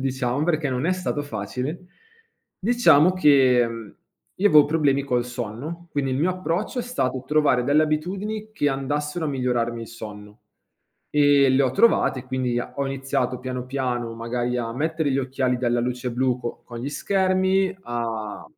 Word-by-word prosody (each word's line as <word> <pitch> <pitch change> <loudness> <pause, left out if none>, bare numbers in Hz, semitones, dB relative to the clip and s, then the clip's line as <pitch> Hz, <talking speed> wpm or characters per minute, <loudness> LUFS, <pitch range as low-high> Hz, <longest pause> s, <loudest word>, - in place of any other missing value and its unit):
diciamo, 130 +1 -1
perché 155 -4 0
non 125 +4 -1
è 185 - +2
stato 180 -5 -2
facile. 130 - -4 0.8
Diciamo 185 -7 +4
che 135 -8 +4 0.7
io 205 +2 +3
avevo 150 -4 +7
problemi 145 -3 +1
col 125 -3 0
sonno, 125 +9 -6
quindi 135 -2 -1
il - - 0
mio 170 +5 +2
approccio 185 +6 -2
è - - 0
stato 130 - -2
trovare 150 -5 +2
delle 145 +4 +4
abitudini 195 +8 -2
che 145 -9 +1
andassero 150 +4 -2
a - - -1
migliorarmi 120 -3 -1
il - - -9
sonno 105 -1 -10 0.7
e 145 -2 +4
le 130 +1 +4
ho 130 - +2
trovate, 130 - +3
quindi 130 -2 -1
a 120 - -5
ho 140 - -1
iniziato 135 -2 -2
piano 125 -1 -5
piano 125 -3 -2
magari 120 +2 -2
a 115 -1 -3
mettere 155 +3 -1
gli 135 - +1
occhiali 130 -1 0
dalla 120 -1 0
luce 125 +1 -2
blu 125 +1 0
co 120 - -6
con 120 -1 -9
gli 130 +4 -4
schermi, 190 +3 +1
a 115 - -4
135 Hz, 165 wpm, -23 LUFS, 125-155 Hz, 0.8 s, avevo